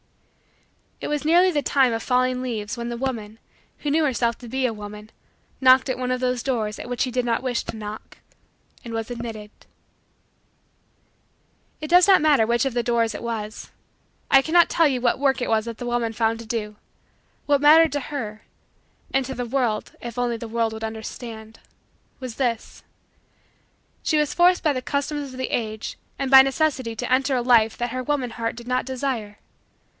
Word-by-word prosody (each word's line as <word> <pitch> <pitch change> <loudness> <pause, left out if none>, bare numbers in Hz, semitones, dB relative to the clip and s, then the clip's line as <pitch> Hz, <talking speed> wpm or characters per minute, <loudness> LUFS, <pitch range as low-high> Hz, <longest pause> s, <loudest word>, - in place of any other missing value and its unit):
It - - -5
was 295 0 -2
nearly 350 +4 +5
the 295 -3 0
time 265 -4 +3
of 225 - -2
falling 255 0 +1
leaves 225 -2 -4
when 235 0 -4
the 235 - -4
woman, 225 -4 -4 0.4
who 295 - -3
knew 315 +2 +3
herself 235 -5 0
to 245 - -10
be 260 +2 -1
a 240 - 0
woman, 210 0 -9 0.5
knocked 260 0 +5
at 260 - -1
one 250 0 -3
of 255 - 0
those 250 -1 -1
doors, 225 -5 -2
at - - -7
which 245 - -3
she 255 - 0
did 250 0 -1
not 235 +1 0
wish 245 -2 -1
to - - -7
knock, 215 0 -8 0.7
and 235 - -7
was 225 0 -3
admitted. 225 -3 -6 2.3
It 305 - -4
does 355 +3 +6
not 385 -4 +6
matter 295 -7 +4
which 235 +2 +2
of 270 - -1
the 240 - +2
doors 230 -2 +1
it - - -6
was. 220 -2 -5 0.6
I 270 - +7
cannot 340 +3 +4
tell 330 -2 +4
you 260 -3 -1
what 245 +1 +1
work 270 -2 +1
it - - -1
was 220 -1 +1
that 230 -1 -6
the 245 - -5
woman 240 -2 -1
found 225 +1 0
to 230 - -9
do. 215 -2 -4 0.7
What 285 -1 +3
mattered 315 +2 +7
to 290 - 0
her 230 -7 -6 0.7
and 270 -1 +2
to 265 - -5
the 245 - -3
world 235 -3 -1
if 235 -1 -7
only 240 -1 0
the 230 - -7
world 225 0 -1
would 220 0 -7
understand 220 0 -7 0.6
was 255 -4 -7
this: 240 -4 -2 1.2
that - - -11
she 310 - +3
was 300 -1 +1
forced 355 +1 +4
by 305 -3 +3
the 255 - -3
customs 285 0 -3
of 255 - -10
the 260 - -3
age 220 -2 -3 0.2
and 275 -1 -2
by 265 0 +11
necessity 270 -4 -1
to 245 +3 -4
enter 265 +1 +2
a 250 - +1
life 230 -3 +4
that 240 0 -2
her 255 +1 -3
woman 265 -3 -1
heart 230 -1 -3
did 240 0 -11
not 255 0 0
desire. 250 -5 -3
245 Hz, 200 wpm, -23 LUFS, 225-270 Hz, 2.3 s, by